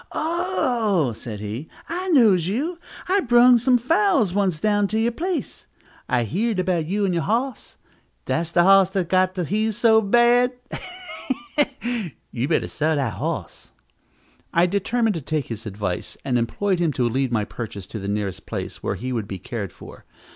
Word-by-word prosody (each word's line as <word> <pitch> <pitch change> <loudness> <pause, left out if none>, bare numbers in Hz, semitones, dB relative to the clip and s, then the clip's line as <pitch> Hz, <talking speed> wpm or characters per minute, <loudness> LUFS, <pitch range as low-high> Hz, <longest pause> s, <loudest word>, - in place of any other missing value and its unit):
"Oh," 205 - 0
said 110 -1 -7
he, 110 +8 -5 0.2
"I 360 +3 -3
knows 215 - +5
you, 300 - -2 0.3
I 385 +2 +3
brung 240 -4 +6
some 250 +1 +4
fowls 320 - +2
once 190 -5 +1
down 205 +1 +2
to 220 +2 -1
you 230 +2 +2
place. 350 +8 -4 0.4
I 125 -3 +2
heerd 205 - -1
about 180 -4 0
you 200 +3 0
and 185 - 0
your 170 - 0
hos. 235 +9 -2 0.5
Dats 165 0 -1
de 175 - +4
hos 195 0 +6
dats 190 -3 -1
got 185 +1 +2
de 180 - -1
heaves 215 +4 -1
so 225 -2 +5
bad, 240 +4 +4 0.2
heh! 310 -11 -6 0.5
heh! 235 -6 -2 0.2
You 125 +2 -2
better 160 - +1
sell 155 +1 0
dat 135 -5 0
hoss." - - -5 0.8
I 170 +1 +4
determined 215 +4 +1
to - - -5
take 150 0 -2
his 110 -1 -6
advice, 100 -3 -4
and 130 - 0
employed 185 - 0
him 170 -3 +2
to 125 -2 +1
lead 130 +2 0
my 110 -3 +1
purchase 110 -5 -7
to 110 - -7
the 100 - -5
nearest 100 -2 -3
place - - -5
where - - -2
he 130 +2 -4
would 110 -4 -2
be 95 - -5
cared 100 +1 -5
for. - - -13
190 Hz, 180 wpm, -23 LUFS, -, 0.8 s, brung